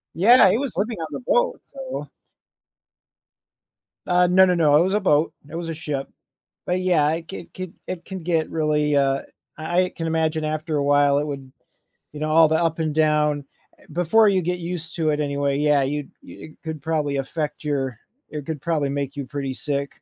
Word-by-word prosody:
Yeah, 205 +3 +7
he - - +2
was 275 -3 -3
living 215 +4 -1
on 160 - -3
the - - -4
boat, - - +1
so. - - -7 2.0
Uh, 180 0 +4
no, 190 +1 +6
no, 180 -1 +2
no, 150 -4 +4
it 165 - +5
was 190 +2 0
a - - +3
boat, 155 -5 +2 0.2
it 165 - -8
was 170 -1 -4
a - - -2
ship. 145 -3 -4 0.6
But, 180 +1 0
yeah, 170 -5 +3
it 165 0 -5
could 190 - -9
could 185 -2 -7
it 175 -2 -6
can 190 -1 -6
get 165 -2 0
really, 150 -2 +1
uh 135 -1 +2 0.4
I 175 +3 +1
I - - -5
can 165 -2 -5
imagine 160 -1 0
after 155 0 -2
a 140 - +1
while 145 0 +4
it 145 - 0
would 135 -3 -6 0.6
you 150 - -7
know, 155 0 -2
all 160 +1 +6
the 160 - +1
up 165 0 0
and 155 -2 -1
down 150 -2 +2 0.3
eh, - - -21
before 190 +6 +4
you 190 -2 +2
get 180 +1 -2
used 170 -1 -5
to 160 -2 0
it, 150 0 0
anyway, 140 -1 0
yeah 150 -1 +3
you 145 +1 -2 0.2
it 155 - -12
could 160 -3 -5
probably 150 -2 -1
affect 150 +2 -4
your 135 -5 -2 0.3
it 150 -2 -6
could 155 -4 -5
probably 155 -5 0
make 140 0 -3
you 140 - -4
pretty 135 -1 -4
sick. 140 +1 -3
155 Hz, 205 wpm, -23 LUFS, 145-175 Hz, 2.0 s, Yeah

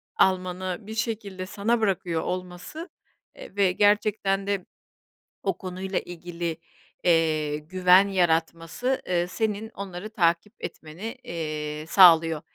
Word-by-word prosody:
almanı 185 -1 +1
bir 220 +2 -8
şekilde 210 -5 -3
sana 220 +5 0
bırakıyor 180 -5 0
olması, 185 - -5 0.5
eee, - - -12
ve 195 -2 +3
gerçekten 205 -1 +2
de 200 -3 -1 0.8
o - - -1
konuyla 190 0 -3
ilgili, 170 -1 -5 0.5
eee, 155 -3 +2
güven 180 +4 +4
yaratması, 170 +6 0
ııı, 175 -1 +1
senin 220 +2 -2
onları 200 -1 -7
takip 175 0 +1
etmeni, 180 - -7
eee, 155 -2 -4
sağlıyor. 165 -4 +6
185 Hz, 110 wpm, -26 LUFS, 170-200 Hz, 0.8 s, sağlıyor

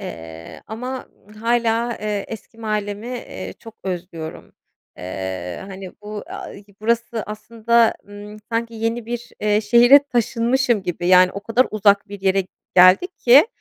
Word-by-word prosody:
eee, 80 0 -9
ama, 250 +4 -5 0.2
ımm, 210 - -16
hâlâ, 230 +1 0
eee, 210 -1 -2
eski 225 0 -10
mahallemi, 210 -1 -3
eee, 95 - -6
çok 225 -1 -12
özlüyorum. 170 -3 -6 0.5
Eee, 95 -1 -5
hani, 190 -1 -8
bu, 210 0 -6
a - - -7
i 200 - -13 0.2
burası 230 0 0
aslında, 230 +2 +1
ımm, 205 +1 -10 0.2
sanki 230 0 -1
yeni 225 +1 -2
bir, 240 0 -5
eee, 210 0 +2
şehre 240 +5 +7
taşınmışım 240 -3 +1
gibi, 175 -1 -3
yani, 185 0 +6
o 200 - -5
kadar 230 +5 +2
uzak 205 -1 +3
bir 200 -1 -8
yere 195 0 +2 0.3
geldik 185 - +6
ki, 270 - +7
215 Hz, 145 wpm, -21 LUFS, 195-235 Hz, 0.5 s, şehre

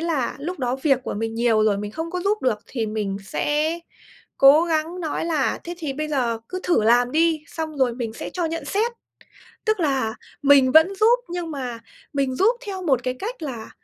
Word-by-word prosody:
là 320 -7 -1
lúc 335 +4 -5
đó 250 0 -1
việc 275 -4 +4
của - - -3
mình 225 +1 -3
nhiều 230 -2 +3
rồi, 205 -2 +2
mình 205 0 -4
không 325 +6 -5
có 360 0 -3
giúp 410 +3 0
được 235 -5 +1
thì 230 -4 -3
mình 210 -2 -2
sẽ 305 - 0 0.6
cố 285 +5 +7
gắng 330 +2 -1
nói 320 -1 -2
là 315 -5 0
"Thế 345 +1 -5
thì 300 -5 -3
bây 305 +2 -4
giờ 245 -6 0
cứ 370 0 -4
thử 345 -11 +2
làm 245 +2 +4
đi, 320 -1 +2
xong 315 -2 -5
rồi 245 -3 +2
mình 235 -3 -4
sẽ - - -7
cho 355 -2 -2
nhận 330 -1 -4
xét." 435 +10 0 0.7
Tức 435 -4 +1
là 265 -7 0 0.3
mình 275 -2 +6
vẫn 320 +5 +6
giúp 455 +5 +4
nhưng 345 -1 -4
mà 255 -5 -5 0.3
mình 275 -2 0
giúp 455 - +3
theo 380 -2 -5
một 270 -8 +2
cái 255 0 -2
cách 415 - -6
là 240 -7 -6
295 Hz, 210 wpm, -23 LUFS, 245-335 Hz, 0.7 s, cố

